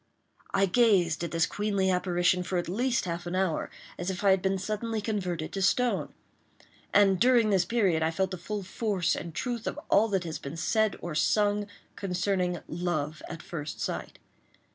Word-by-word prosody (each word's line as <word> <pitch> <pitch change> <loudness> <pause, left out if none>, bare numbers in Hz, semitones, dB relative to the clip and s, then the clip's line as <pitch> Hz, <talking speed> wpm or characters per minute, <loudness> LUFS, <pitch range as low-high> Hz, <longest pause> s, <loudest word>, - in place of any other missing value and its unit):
I 195 - +3
gazed 185 -7 +3
at 170 - -2
this 165 0 +2
queenly 200 -1 0
apparition 180 0 +2
for 180 0 -2
at 175 - -1
least 235 +5 0
half 175 0 -4
an 175 - -3
hour, 185 -4 0 0.3
as 175 +1 -2
if 190 +1 -4
I 200 - +6
had 190 -1 +3
been 190 0 +1
suddenly 215 +3 -2
converted 185 -7 -3
to 195 - -2
stone; 235 +6 +1 0.8
and, 195 -2 +5
during 240 -3 +4
this 190 -3 +3
period, 190 -6 +2
I 160 - +2
felt 190 +3 -1
the 185 - -5
full 205 +3 -4
force 190 -2 0
and 170 - -6
truth 240 -3 -3
of - - -3
all 215 +3 +5
that 195 -4 0
has 165 -2 -5
been 140 +4 -7
said 215 +6 +1
or 175 - -4
sung 205 +6 +2 0.3
concerning 180 -1 -1
"love 155 -3 -2
at 165 -2 -7
first 150 -4 -6
sight." - - -4
190 Hz, 185 wpm, -28 LUFS, 175-205 Hz, 0.8 s, I